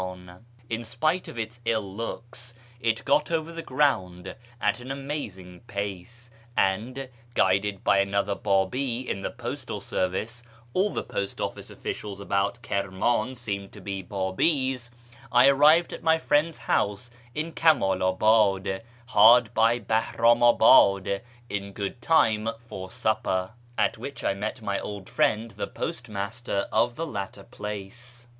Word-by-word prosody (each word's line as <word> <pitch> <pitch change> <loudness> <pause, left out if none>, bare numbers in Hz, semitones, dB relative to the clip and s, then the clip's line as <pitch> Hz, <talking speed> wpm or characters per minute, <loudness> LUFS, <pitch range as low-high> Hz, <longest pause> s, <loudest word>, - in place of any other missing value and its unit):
In 115 0 -3
spite 155 +10 -1
of - - -9
its 115 +2 -5
ill 110 -4 -1
looks, 120 +2 -6 0.2
it 115 -2 0
got 140 - +3
over 165 0 -1
the 165 - -5
ground 95 - 0 0.3
at 105 0 +1
an 125 +1 -9
amazing 135 -11 -6
j)ace, 100 +5 -6 0.3
and, 115 +8 0 0.3
guided 95 +1 +2
by 100 - +4
another 100 +1 +1
Babi 115 +7 0
in 95 - -2
the - - -2
postal - - -5
service 105 +6 -2 0.3
(all 195 +3 +2
the - - -3
post 100 0 -4
office - - -4
officials 100 -2 -6
about 100 +4 -1
Kirman 100 +6 0
seemed 100 -5 -5
to 105 - -11
be 95 0 -4
Babis), 120 - 0 0.4
I 125 +2 +6
arrived 150 +5 +5
at - - -7
my 160 0 +4
friend's 155 +1 +1
house 105 +4 -1 0.2
in 155 +2 -2
Kamalabad, 95 - +3 0.2
hard 115 0 +6
by 115 +1 +4
Bahramabad, 110 -3 +4 0.3
in 100 -2 -4
good 100 +4 -4
time 110 -9 +3
for 95 -5 -9
supper, 110 -5 -1 0.3
at - - +1
which 140 - -7
I - - +2
met 110 +4 -5
my 100 -1 -1
old 100 -2 -7
friend 110 +2 +1
the 100 - -4
postmaster 110 -5 -3
of 120 +2 +2
the 165 - -3
latter 100 -7 -6
place. 120 +5 -8
110 Hz, 135 wpm, -26 LUFS, 100-125 Hz, 0.4 s, I